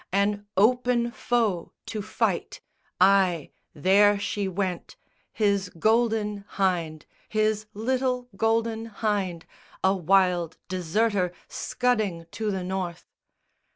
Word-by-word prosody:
An 205 +1 0
open 240 +2 +3
foe 225 -9 -1
to 215 - -4
fight! 220 - -1 0.4
Ay, 185 -4 +4 0.2
there 200 +6 +5
she 200 0 -2
went, 185 -1 -3 0.4
His 200 -3 +1
Golden 220 0 +1
Hynde, 170 -5 0 0.2
his 215 0 0
little 250 +2 -1
Golden 225 +1 0
Hynde 200 -6 -2 0.4
A 190 +1 +4
wild 180 -2 +2
deserter 185 +1 0 0.2
scudding 215 -9 -1
to 220 -1 -2
the 190 -2 -2
North. 180 -2 -4
205 Hz, 100 wpm, -26 LUFS, 185-225 Hz, 0.4 s, there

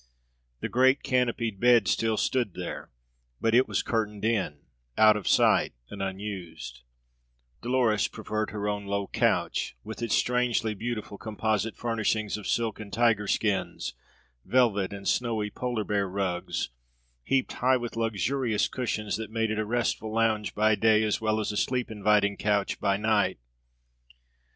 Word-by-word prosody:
The - - -1
great 130 +3 +3
canopied 120 -5 0
bed 120 -3 +5
still 110 +4 +1
stood 120 -6 0
there; - - -6 0.5
but 115 0 +1
it 125 +2 +5
was - - -1
curtained 105 -2 -2
in, 100 -10 0 0.4
out 110 0 +7
of 105 - -4
sight, - - +4 0.2
and 100 - -6
unused; 95 -10 -6 0.8
Dolores 120 -4 +2
preferred 110 0 -3
her 105 -1 -4
own 105 -1 -3
low 100 0 -1
couch, - - 0
with - - -8
its 115 -2 +1
strangely 125 -3 +1
beautiful 105 -1 -5
composite 110 0 -1
furnishings 110 -2 -1
of 105 - -6
silk 115 -2 0
and 105 -2 -8
tiger 115 -3 +2
skins, 100 -2 -1 0.5
velvet 110 -7 +2
and 100 -1 -7
snowy 110 -4 0
polar 120 -2 -2
bear 100 -2 -1
rugs, 90 -8 -2 0.5
heaped 135 - 0
high 130 +1 +3
with 120 -2 -5
luxurious 115 +1 0
cushions 110 -4 -2
that 110 0 -6
made 110 0 -1
it 110 - -1
a 110 - 0
restful 115 -1 -1
lounge 110 -1 0
by 110 +1 +3
day 110 0 +4
as 110 0 0
well 110 0 +1
as 105 - -1
a 105 - -4
sleep 125 0 0
inviting 105 -1 +2
couch 105 -1 0
by 100 -1 +1
night. 110 0 +1
110 Hz, 150 wpm, -27 LUFS, 105-115 Hz, 0.8 s, out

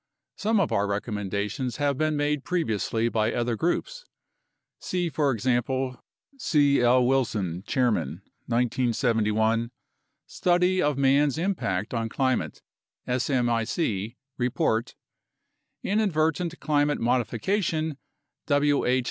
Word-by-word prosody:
Some 220 +1 +1
of 185 - +1
our 100 +1 +1
recommendations 105 +4 -3
have 145 -1 +1
been 155 +2 0
made 145 -1 0
previously 115 - -1
by 110 -1 +1
other 120 -1 -1
groups - - -2 0.8
[see, 180 -2 -2
for 145 -2 +1
example, 130 +2 -1 0.4
C. 145 - +3
L. 125 +1 +4
Wilson 110 -10 0
(Chairman), 105 - 0 0.2
1971: 115 -2 +1 0.6
Study 180 +1 +1
of 145 -2 +1
Man's 140 +1 +3
Impact 125 - -1
on 115 -1 -1
Climate 130 - -1 0.4
(smic) 120 - 0 0.2
Report, 120 -2 0 0.9
Inadvertent 170 -4 0
Climate 145 -1 +1
Modification, 150 - 0 0.5
W. 145 -1 +2
H. 125 +1 +3
130 Hz, 100 wpm, -26 LUFS, 115-150 Hz, 0.9 s, L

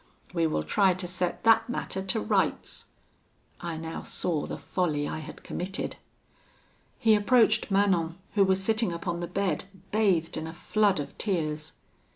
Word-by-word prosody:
We 165 -2 +2
will 155 - -1
try 195 -3 +3
to 185 0 -3
set 180 0 -2
that 225 +1 +5
matter 190 -5 -3
to 190 0 0
rights.' 105 - 0 0.7
"I 170 -2 -4
now 160 0 -5
saw 160 -5 -2
the - - -5
folly 150 -6 -1
I - - -4
had 155 - -10
committed. 185 +2 -4 1.0
"He 220 -1 +4
approached 220 +1 +4
Manon, 190 -4 +2 0.2
who 200 -1 +5
was 190 0 +2
sitting 220 -1 +2
upon 170 0 -3
the 175 - -3
bed, 190 -4 -1 0.3
bathed 195 -7 +2
in 160 - -4
a 160 - -7
flood 205 +1 +2
of 145 - -5
tears. 155 -6 -1
180 Hz, 160 wpm, -28 LUFS, 165-200 Hz, 1.0 s, that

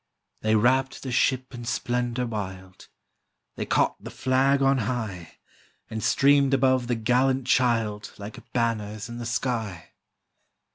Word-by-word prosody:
They 110 0 +2
wrapt 130 +4 +2
the 130 - -4
ship 130 +1 +1
in 120 -1 -7
splendor 120 +1 -1
wild, 95 -5 -7 0.7
They - - -4
caught - - +1
the - - -7
flag 135 +2 +2
on 135 0 +3
high, 110 -8 -4 0.5
And 110 -1 -4
streamed 140 -1 +4
above 130 -2 +2
the 120 - 0
gallant 125 +3 +1
child, 115 -5 +1
Like 110 +4 -10
banners 110 -2 -2
in 120 0 -7
the 120 - -4
sky. 110 -7 -3
120 Hz, 135 wpm, -26 LUFS, 110-130 Hz, 0.7 s, streamed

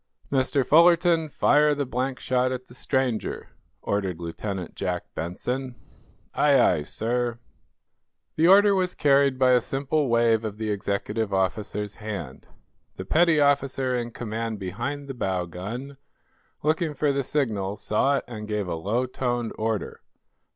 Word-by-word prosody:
"Mr. 135 0 +1
Fullerton, 170 0 +5
fire 150 +1 +3
the 140 -1 -1
blank 130 +2 -2
shot 130 0 +1
at 130 0 -4
the 120 - -15
stranger," 130 -3 -2 0.3
ordered 95 -4 -2
Lieutenant 90 +2 -5
Jack 90 -2 -3
Benson. 125 +10 -4 0.6
"Aye, 140 -2 +4
aye, 90 -9 +3
sir." 120 +8 -2 1.0
The 160 +2 +3
order 200 +2 +7
was 185 -2 0
carried 140 -2 +3
by 130 -1 +4
a 125 -1 +5
simple 140 +2 -1
wave 115 -1 +3
of 105 -2 -5
the 110 -1 -2
executive 100 +2 -2
officer's 100 +2 -2
hand. 100 - -7 0.5
The - - -7
petty 165 -1 +3
officer 140 -2 +2
in 120 -1 -2
command 115 -1 -4
behind 120 +10 -4
the 135 - -5
bow 95 -7 -1
gun, 115 - -7 0.7
looking 155 0 0
for 150 -1 +1
the 140 0 0
signal, 105 -8 -1
saw 140 +6 +1
it - - -3
and 110 -3 -7
gave 105 -3 -2
a 85 - -2
low 105 +10 -1
toned 120 -2 -2
order. 110 -1 -3
125 Hz, 145 wpm, -25 LUFS, 105-140 Hz, 1.0 s, order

